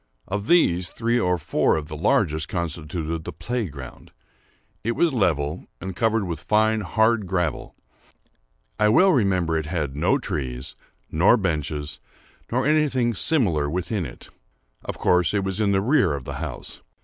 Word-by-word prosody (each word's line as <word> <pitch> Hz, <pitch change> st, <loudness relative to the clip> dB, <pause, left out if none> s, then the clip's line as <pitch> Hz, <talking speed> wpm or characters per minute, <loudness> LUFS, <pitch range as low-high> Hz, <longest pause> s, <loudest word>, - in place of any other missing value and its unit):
Of 100 Hz, +2 st, -3 dB
these, 90 Hz, -, +3 dB
three 120 Hz, +1 st, 0 dB
or 90 Hz, -5 st, +1 dB
four 80 Hz, -, +1 dB
of 75 Hz, -1 st, -3 dB
the 75 Hz, -, -7 dB
largest 80 Hz, 0 st, +1 dB
constituted 80 Hz, -1 st, -4 dB
the -, -, -5 dB
play 120 Hz, -3 st, -3 dB
ground. 70 Hz, -5 st, -10 dB, 0.7 s
It 115 Hz, +2 st, 0 dB
was 165 Hz, +4 st, +2 dB
level, 80 Hz, -, 0 dB
and 95 Hz, -1 st, -6 dB
covered 110 Hz, 0 st, +1 dB
with 85 Hz, -3 st, -4 dB
fine 110 Hz, +3 st, +2 dB
hard 110 Hz, +2 st, +2 dB
gravel. 90 Hz, -5 st, -2 dB, 1.0 s
I 105 Hz, 0 st, +4 dB
well 185 Hz, -, +5 dB
remember 95 Hz, -, +2 dB
it 80 Hz, -, -5 dB
had 75 Hz, -5 st, -2 dB
no 75 Hz, -, +2 dB
trees, 65 Hz, -3 st, -4 dB, 0.4 s
nor -, -, +5 dB
benches, 75 Hz, -2 st, -3 dB, 0.5 s
nor 125 Hz, +2 st, +1 dB
anything 140 Hz, -6 st, +2 dB
similar 95 Hz, -, +1 dB
within 90 Hz, +2 st, -2 dB
it. -, -, -13 dB, 0.5 s
Of -, -, -5 dB
course 90 Hz, +1 st, +2 dB
it 100 Hz, -, +1 dB
was 95 Hz, +2 st, -1 dB
in 100 Hz, -2 st, +2 dB
the 95 Hz, -1 st, +2 dB
rear 120 Hz, -, +3 dB
of 70 Hz, -, -6 dB
the -, -, -6 dB
house. -, -, -6 dB
90 Hz, 160 wpm, -24 LUFS, 80-110 Hz, 1.0 s, well